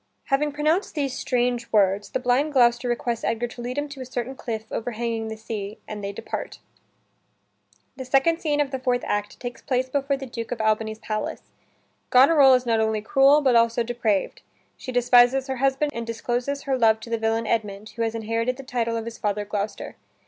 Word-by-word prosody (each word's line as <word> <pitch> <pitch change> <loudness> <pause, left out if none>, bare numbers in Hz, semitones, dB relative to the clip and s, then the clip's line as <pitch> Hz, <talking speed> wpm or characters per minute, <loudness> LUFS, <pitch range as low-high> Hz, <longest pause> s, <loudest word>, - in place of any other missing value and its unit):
Having 285 +2 +1
pronounced 310 +7 0
these 275 -4 -1
strange 245 -2 -1
words, 200 -1 +2
the - - -2
blind 260 +4 +1
Gloucester 240 -1 +3
requests 240 -1 -2
Edgar 230 +1 0
to 240 - -9
lead 250 +3 -5
him 290 0 -1
to 280 -2 -9
a - - -5
certain 250 0 -4
cliff 225 -4 -4
overhanging 230 -1 -3
the 220 0 -6
sea, 215 -1 -6
and 210 -1 -6
they 200 - -3
depart. 200 - -6 1.4
The 260 - -5
second 275 +6 +2
scene 295 -2 0
of 285 -2 +1
the 265 - -3
fourth 250 -1 0
act 205 0 -2
takes 245 -1 -6
place 260 0 -1
before 275 +1 0
the 270 - -7
Duke 235 -2 -6
of 245 - -3
Albany's 220 0 0
palace. 215 -1 -4 0.7
Goneril 270 +1 +7
is 250 0 0
not 230 -2 +2
only 220 -1 0
cruel, 275 +6 +5
but 260 -4 +3
also 230 0 +3
depraved. 230 -4 -1 0.3
She 255 - -7
despises 245 +1 +4
her 265 -1 -3
husband 275 +3 +1
and 230 0 -5
discloses 245 +4 -2
her 265 -2 -1
love 220 -2 +4
to 230 - -9
the 230 - 0
villain 225 +1 0
Edmund, 210 -2 -2
who 230 +2 -7
has 225 0 -1
inherited 230 +3 -1
the 270 - -8
title 235 -3 -1
of 225 - -4
his 230 0 -7
father 205 0 -1
Gloucester. 205 0 -4
240 Hz, 200 wpm, -24 LUFS, 225-265 Hz, 1.4 s, Goneril